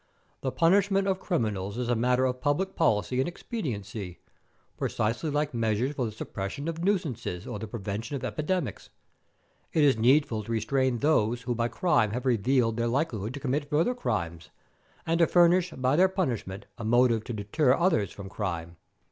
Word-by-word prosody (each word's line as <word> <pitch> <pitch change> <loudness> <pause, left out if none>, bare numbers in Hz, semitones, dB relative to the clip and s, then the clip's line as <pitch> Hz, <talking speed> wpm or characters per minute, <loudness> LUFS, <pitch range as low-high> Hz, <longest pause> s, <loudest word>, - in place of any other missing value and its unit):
The 130 - -1
punishment 195 +4 +3
of 190 -1 +1
criminals 105 - -2
is 125 -1 -2
a 120 - +2
matter 125 +3 +2
of 125 0 -2
public 165 +7 0
policy 125 -4 +1
and 130 - +1
expediency, 110 - -5 0.6
precisely 115 +9 -1
like 145 0 -1
measures 115 +3 0
for 130 -4 -1
the - - -5
suppression 105 +6 -5
of 165 0 -3
nuisances 160 - -1
or 105 - -5
the 110 - -5
prevention 105 +5 -4
of 135 - -5
epidemics. 150 - -2 0.8
It 155 - +3
is 140 -5 +4
needful 120 -2 +3
to 115 - -6
restrain 130 +2 +1
those 120 -4 +1
who 120 0 -1
by 115 0 0
crime 120 - +1
have 125 +2 -3
revealed 120 -1 +2
their 115 0 0
likelihood 120 -3 -1
to - - -5
commit 145 +1 -2
further 165 +11 +2
crimes, 85 - -3 0.6
and 165 +1 +1
to 165 - +5
furnish 175 +1 +4
by 130 -3 0
their 185 +4 +5
punishment 120 - -3
a - - -5
motive 115 0 +3
to 120 - -5
deter 125 +6 +2
others 165 - +1
from 100 -1 -9
crime." 85 -5 -4
125 Hz, 175 wpm, -28 LUFS, 110-155 Hz, 0.8 s, to